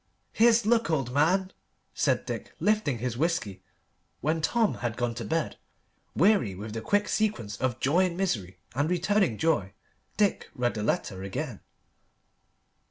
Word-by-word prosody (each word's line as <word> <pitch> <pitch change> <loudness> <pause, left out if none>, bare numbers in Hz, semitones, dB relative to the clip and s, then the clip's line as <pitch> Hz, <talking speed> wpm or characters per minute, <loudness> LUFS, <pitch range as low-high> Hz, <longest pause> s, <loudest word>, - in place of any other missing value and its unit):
"Here's 230 -1 +5
luck, 230 -2 +3
old 135 -6 0
man!" 185 +7 +2 0.4
said - - +1
Dick, - - -6
lifting 210 - +1
his 120 0 -3
whisky. 155 - -1 0.6
When 160 +4 0
Tom 225 +6 +2
had 120 -2 -2
gone 120 -1 -1
to 115 0 -5
bed, 160 +9 -2 0.6
weary 165 - +3
with 105 +3 -7
the 115 - -4
quick 205 - +1
sequence 120 - -1
of 130 0 -1
joy 170 +8 +3
and 175 -1 -6
misery 105 - -2 0.2
and 145 +5 0
returning 180 - +2
joy, 125 - +1 0.4
Dick 205 -2 +1
read 120 -1 0
the 105 - -4
letter 95 -2 -1
again. 105 +4 -4
150 Hz, 150 wpm, -28 LUFS, 115-195 Hz, 0.6 s, Here's